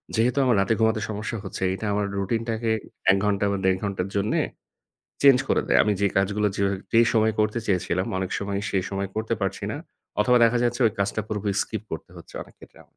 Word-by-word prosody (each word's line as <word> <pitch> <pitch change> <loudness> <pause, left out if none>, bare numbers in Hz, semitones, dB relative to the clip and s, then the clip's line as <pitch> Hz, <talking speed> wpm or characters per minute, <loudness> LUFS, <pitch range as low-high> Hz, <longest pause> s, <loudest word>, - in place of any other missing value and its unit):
যেহেতু 120 +4 +2
আমার 125 - +3
রাতে 100 +4 +2
ঘুমাতে 110 -1 +2
সমস্যা 110 +2 -4
হচ্ছে 95 -1 -5
এটা 110 - -6
আমার 100 0 0
রুটিনটাকে 115 +2 -1 0.4
১ 95 - +3
ঘন্টা 100 0 +1
বা 100 - 0
১.৫ 95 0 +3
ঘন্টার 100 -2 -2
জন্য 100 +2 0 0.9
চেঞ্জ 135 -2 +7
করে - - +2
দেয়। - - +5
আমি 105 - +2
যে, 100 - +3
কাজগুলো 100 +2 +1
যেভাবে 100 0 +1 0.2
যেই 115 0 +6
সময় 110 0 +3
করতে 110 +2 +1
চেয়েছিলাম, 90 -1 0
অনেক 95 0 -3
সময় 100 0 -3
সেই 95 -2 +1
সময় 100 -1 -2
করতে 110 +1 -1
পারছি 95 - -2
না। - - -4 0.4
অথবা 125 +3 +4
দেখা 120 +1 +3
যাচ্ছে 120 +1 -1
ওই 110 - +1
কাজটা 100 +2 0
পুরোপুরি 105 -2 -2
স্কিপ 110 -1 -5
করতে 80 - -6
হচ্ছে - - -13
অনেক - - -18
ক্ষেত্রে - - -16
আমার। - - -36
105 Hz, 210 wpm, -25 LUFS, 100-115 Hz, 0.9 s, চেঞ্জ